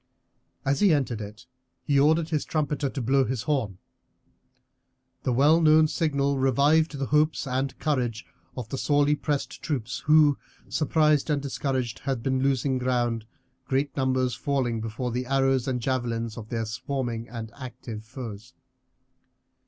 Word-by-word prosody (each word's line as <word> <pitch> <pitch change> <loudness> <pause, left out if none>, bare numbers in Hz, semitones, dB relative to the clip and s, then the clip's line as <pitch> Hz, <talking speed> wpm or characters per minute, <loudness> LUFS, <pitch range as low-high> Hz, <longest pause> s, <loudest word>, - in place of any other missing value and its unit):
As 135 +1 +1
he 200 -3 +5
entered 125 -6 -2
it 105 +4 -9 0.4
he 140 -1 +2
ordered 160 +3 +3
his 155 -3 0
trumpeter 145 -3 -1
to 135 - -4
blow 135 +3 +3
his 125 -3 -2
horn. 125 -11 -1 1.4
The 130 - -1
well 145 +7 +4
known 155 0 +6
signal 140 -3 0
revived 145 +4 +3
the 140 - -1
hopes 150 +3 +2
and 135 0 -2
courage 125 -7 -1 0.3
of 125 -3 -4
the 135 - -4
sorely 145 0 +3
pressed 150 -1 -3
troops, 125 -5 -3
who, 150 -2 +5 0.3
surprised 155 0 +2
and 150 -1 +2
discouraged, 130 -3 -2
had 135 -4 -3
been 130 -1 0
losing 135 -1 +1
ground, 120 -3 0 0.4
great 135 0 0
numbers 130 -2 +1
falling 125 -4 -1
before 115 +3 -3
the 125 +1 -3
arrows 135 -1 +2
and 130 -2 0
javelins 115 -3 -2
of 110 -2 -9
their 115 -1 -2
swarming 120 0 -4
and 115 -1 -7
active 120 -4 -8
foes. 115 -1 -9
135 Hz, 145 wpm, -26 LUFS, 120-145 Hz, 1.4 s, known